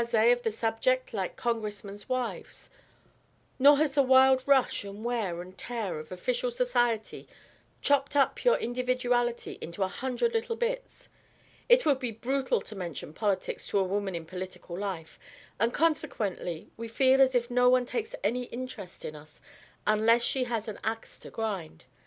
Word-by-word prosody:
_ 235 0 +4
of 245 - -3
the 225 - 0
subject 235 +4 0
like 190 -4 -2
Congressmen's 210 -2 -4
wives, 255 -2 -4 0.9
nor 285 +2 +8
has 300 -1 +2
the 285 - +5
wild 260 0 +6
rush 275 -6 +3
and 200 +2 -8
wear 205 -8 -1
and 185 +1 -14
tear 225 -9 -3
of 155 0 -10
official 240 +7 -1
society 240 -2 0 0.6
chopped 285 0 +2
up 280 -1 +2
your - - +5
individuality 245 -1 -1
into 170 +4 -3
a - - +1
hundred 260 - -1
little 455 0 -1
bits. - - -4 0.6
It - - +6
would 285 -4 +3
be 250 -2 -2
brutal 260 +4 -1
to 215 - -8
mention 170 -5 -6
politics 205 +1 -1
to - - 0
a 195 - +4
woman 195 0 -2
in 165 -1 -5
political 185 0 -7
life, 185 -4 -5 0.4
and 230 +3 +2
consequently 230 - -1
we 230 +1 -5
feel 265 +3 +4
as 260 -1 +5
if 240 0 +1
no 250 0 +5
one 250 0 +4
takes 455 - -3
any 250 +1 0
interest 240 -7 -7
in 155 - -5
us 150 0 -14 0.5
unless 220 +3 +4
she 260 0 +1
has 230 -2 -3
an 215 - -6
axe 225 0 -4
to - - -10
grind. 195 - -4
235 Hz, 165 wpm, -29 LUFS, 200-260 Hz, 0.9 s, nor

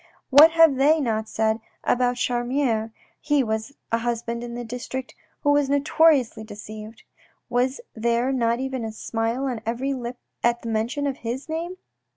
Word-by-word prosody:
What 305 +4 +9
have 325 -5 +6
they 300 +4 +4
not 220 -5 -1
said 220 0 0 0.2
about 245 0 +2
Charmier 240 -2 0 0.3
(he 295 -2 +2
was 220 +3 -3 0.2
a 230 - +2
husband 235 0 -2
in 235 0 -6
the 240 0 -5
district 250 +2 -5 0.3
who 290 - +4
was 290 -1 +3
notoriously 285 -5 +3
deceived 215 +1 -10 0.3
?) - - -41
Was 255 +2 +1
there 235 +3 +1
not 235 -2 +1
a 260 -4 -3
smile 230 +4 -2
on 245 -5 -3
every 240 +5 -1
lip 245 -1 -5 0.3
at 240 0 +2
the 230 - -4
mention 230 +6 -1
of 275 -1 -1
his 240 +3 -5
name 330 +3 -4
245 Hz, 165 wpm, -24 LUFS, 230-275 Hz, 0.3 s, What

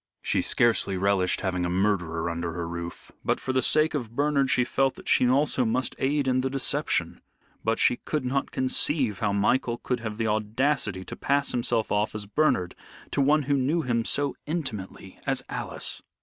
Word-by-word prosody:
She - - +2
scarcely 110 -5 +2
relished 95 -1 +1
having 90 -2 -1
a 90 - 0
murderer 90 -3 0
under 85 0 -3
her 85 -1 -4
roof, 85 0 -7
but - - 0
for 130 - -3
the 130 - +2
sake 155 +5 +3
of 120 -6 -4
Bernard 140 -1 +2
she 125 - +3
felt 135 +2 +1
that - - -13
she 125 - +4
also 135 0 +3
must 125 +3 0
aid 140 +1 +1
in 130 0 +2
the 135 - -1
deception. 135 0 0 0.4
But 115 +1 +1
she 120 - +3
could 150 -4 -3
not 135 +2 -1
conceive 130 - 0
how 105 -2 +1
Michael 120 +4 +1
could 125 +1 -2
have 110 -2 -5
the 115 - -1
audacity 110 -1 0
to - - -7
pass 140 0 0
himself 120 -2 0
off 105 +1 0
as 105 -1 -4
Bernard 100 -6 +1 0.4
to 140 - +1
one 150 +2 +3
who 140 +1 0
knew 145 +5 +1
him 115 -2 0
so 145 +4 0
intimately 110 - -5
as - - 0
Alice. - - -3
120 Hz, 190 wpm, -26 LUFS, 100-135 Hz, 0.4 s, she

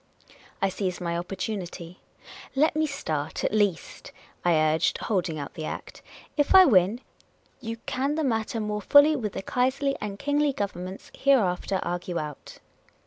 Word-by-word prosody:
I 195 - +4
seized 185 -2 -3
my 170 -2 -2
opportunity. 180 -1 -5 0.3
" - - -15
Let 300 +3 +3
me 310 0 +2
start, 155 - -3
at - - 0
least," 205 -5 -1 0.3
I 175 -1 +3
urged, 155 0 +2
holding 180 -7 -1
out 145 -1 -6
the 155 - -6
Act. - - -7 0.2
" - - -24
If 290 +5 +3
I 375 -1 +10
win, 205 - +3 0.6
you 230 -3 -5
can 275 +3 -1
the 315 - -1
matter 225 -3 -1
more 210 -1 -2
fully 285 +8 +6
with 215 -8 -3
the - - -5
Kaiserly 270 +4 0
and 200 -1 -4
Kingly 290 +3 +1
Governments 190 -3 -5
here 275 0 +4
after 190 -2 0
argue 175 0 -3
out." 150 -3 -7
205 Hz, 165 wpm, -26 LUFS, 175-270 Hz, 0.6 s, I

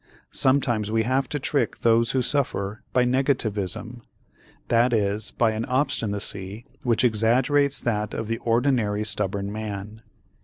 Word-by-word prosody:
Sometimes 120 -6 +2
we 110 0 +2
have 130 +3 0
to 150 - -2
trick 140 0 -1
those 115 0 +3
who 130 -1 +1
suffer 110 -7 -2
by 125 - +3
"negativism," 120 -4 -1 0.7
that 120 +1 +3
is 105 -1 +2
by 115 -2 +1
an 110 +1 -3
obstinacy 105 -5 -2 0.2
which 120 -2 +1
exaggerates 125 +5 +2
that 105 -3 -2
of 110 - -4
the 115 +1 -2
ordinary 115 -3 +1
stubborn 100 -1 -1
man. 105 0 -6
115 Hz, 130 wpm, -24 LUFS, 105-125 Hz, 0.7 s, those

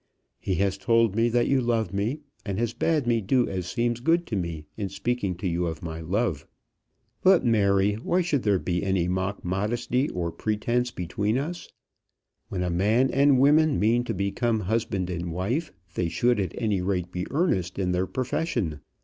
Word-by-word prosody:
He 95 - -1
has 95 +1 0
told 115 -2 +3
me 115 +1 +3
that 120 0 +2
you 135 -1 +3
love 115 -5 0
me, 110 +10 -1 0.2
and 100 -3 -3
has 115 0 -1
bade 155 -5 +1
me 120 -1 +2
do 125 +5 +2
as 90 -2 -4
seems 120 +4 -1
good 165 +7 +2
to 110 - -4
me 85 -5 -3
in 100 -2 -3
speaking 100 -2 -2
to 95 +2 -4
you 85 0 0
of 85 +4 -5
my 80 -1 -5
love. 95 -1 -1 0.7
But, 185 -6 +5
Mary, 100 -3 +3
why 170 - 0
should 160 -6 0
there 105 -3 +2
be 90 -1 -1
any 95 -3 +1
mock 95 +2 -2
modesty 115 +8 0
or 85 -2 -3
pretence 115 +7 -1
between 105 +3 -1
us? 165 +6 -4 0.8
When 90 -2 -2
a 90 - -1
man 110 +9 +2
and 140 0 +4
woman 150 +2 +4
mean 115 +3 +3
to 115 - -3
become 110 +4 0
husband 100 -3 -1
and 85 -1 -3
wife, 115 - -2 0.2
they 90 -2 -1
should 120 +7 +2
at 95 -4 -2
any 105 -5 0
rate 90 -2 -1
be 90 0 -3
earnest 110 - 0
in 95 -2 0
their 90 +1 0
profession. 120 - -2
105 Hz, 185 wpm, -26 LUFS, 90-120 Hz, 0.8 s, But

